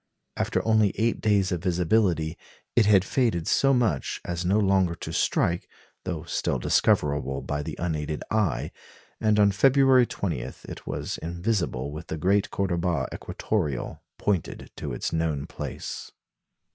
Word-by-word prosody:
After -, -, -1 dB
only 110 Hz, -3 st, +4 dB
eight 115 Hz, +3 st, +1 dB
days 100 Hz, -3 st, +2 dB
of 90 Hz, -3 st, -1 dB
visibility, 90 Hz, -2 st, +1 dB, 0.4 s
it 115 Hz, -3 st, +5 dB
had 100 Hz, -3 st, +5 dB
faded 110 Hz, -11 st, 0 dB
so 135 Hz, -, +4 dB
much 115 Hz, -, +1 dB
as 85 Hz, 0 st, -3 dB
no 95 Hz, +4 st, +2 dB
longer 95 Hz, -4 st, +2 dB
to -, -, -7 dB
strike, 85 Hz, +1 st, +1 dB, 0.4 s
though 85 Hz, -4 st, -3 dB
still 85 Hz, -5 st, -1 dB
discoverable 70 Hz, +2 st, +1 dB
by 75 Hz, 0 st, -2 dB
the -, -, -5 dB
unaided 75 Hz, -3 st, -2 dB
eye; 95 Hz, -, 0 dB, 0.5 s
and 105 Hz, -1 st, +3 dB
on 100 Hz, -1 st, +5 dB
February 130 Hz, +4 st, +5 dB
20 85 Hz, -10 st, -2 dB
it -, -, -9 dB
was -, -, -3 dB
invisible 85 Hz, -, -2 dB
with 80 Hz, +3 st, -8 dB
the 80 Hz, -, -4 dB
great 95 Hz, +5 st, +2 dB
Cordoba 85 Hz, -7 st, -1 dB
equatoreal 75 Hz, -, -3 dB, 0.2 s
pointed 100 Hz, -6 st, -2 dB
to -, -, -5 dB
its -, -, -3 dB
known 80 Hz, -3 st, 0 dB
place. -, -, -6 dB
90 Hz, 145 wpm, -26 LUFS, 80-105 Hz, 0.5 s, it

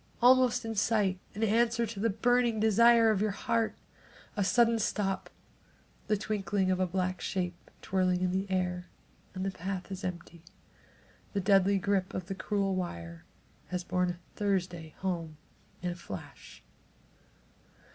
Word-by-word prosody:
almost 250 Hz, -1 st, +5 dB
in 225 Hz, -, -3 dB
sight, 205 Hz, -3 st, +1 dB, 0.2 s
in 215 Hz, -, -2 dB
answer 235 Hz, +2 st, +2 dB
to 215 Hz, -2 st, -7 dB
the 230 Hz, +3 st, +2 dB
burning 235 Hz, +2 st, +2 dB
desire 225 Hz, +1 st, +6 dB
in 200 Hz, -, -1 dB
your 215 Hz, +1 st, +1 dB
heart. 230 Hz, +2 st, -1 dB, 0.6 s
A 205 Hz, -, +1 dB
sudden 230 Hz, +3 st, +3 dB
stop! 200 Hz, -2 st, -1 dB, 0.8 s
The 210 Hz, -, +2 dB
twinkling 200 Hz, -2 st, 0 dB
of 185 Hz, -, 0 dB
a 185 Hz, -, +2 dB
black 185 Hz, +1 st, -2 dB
shape 180 Hz, -3 st, -3 dB
twirling 185 Hz, -1 st, +1 dB
in 180 Hz, -, +1 dB
the 190 Hz, +1 st, -1 dB
air, 180 Hz, -1 st, -1 dB, 0.5 s
and 185 Hz, +1 st, -3 dB
the 195 Hz, -, 0 dB
path 190 Hz, +1 st, -5 dB
is 190 Hz, 0 st, -6 dB
empty! 170 Hz, -2 st, -6 dB, 0.9 s
The 200 Hz, -, 0 dB
deadly 195 Hz, 0 st, +4 dB
grip 195 Hz, -1 st, 0 dB
of 185 Hz, -, -3 dB
the 195 Hz, -, -4 dB
cruel 195 Hz, 0 st, -1 dB
wire 85 Hz, -, -5 dB, 0.4 s
has 180 Hz, 0 st, -3 dB
borne 180 Hz, 0 st, 0 dB, 0.2 s
Thursday 180 Hz, -6 st, -2 dB
home 170 Hz, -5 st, -3 dB, 0.5 s
in 180 Hz, -, 0 dB
a -, -, -5 dB
flash. 95 Hz, -, -10 dB
195 Hz, 145 wpm, -30 LUFS, 180-215 Hz, 0.9 s, desire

